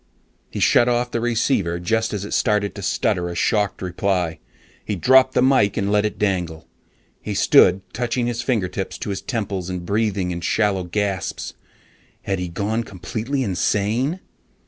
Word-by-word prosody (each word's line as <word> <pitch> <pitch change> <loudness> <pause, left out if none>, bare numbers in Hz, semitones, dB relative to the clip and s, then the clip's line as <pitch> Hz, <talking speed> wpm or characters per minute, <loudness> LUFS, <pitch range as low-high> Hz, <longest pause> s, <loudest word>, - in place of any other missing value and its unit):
He - - -5
shut 120 - +4
off 120 0 0
the 115 - -1
receiver 115 -7 0
just 110 +6 0
as 100 -1 -3
it - - -6
started 105 -2 +1
to - - -8
stutter 90 0 0
a 85 - -6
shocked 100 +1 0
reply. 90 -2 -1 0.4
He 105 - -3
dropped 130 +7 +4
the - - +4
mike 130 -7 +3
and 100 0 0
let 105 0 +3
it 105 - -3
dangle. 90 -6 -2 0.5
He - - -4
stood 95 +1 +5
touching 120 0 -1
his 120 0 -2
fingertips 100 -6 -2
to 105 - -4
his 95 - -4
temples 100 -7 -3
and 90 -1 -4
breathing 100 -2 0
in 85 0 -4
shallow 100 0 +1
gasps. 95 0 -3 0.7
Had 95 -1 -2
he 90 - -3
gone 105 +6 -1
completely 115 +7 -3
insane? 110 - 0
100 Hz, 165 wpm, -21 LUFS, 90-115 Hz, 0.7 s, stood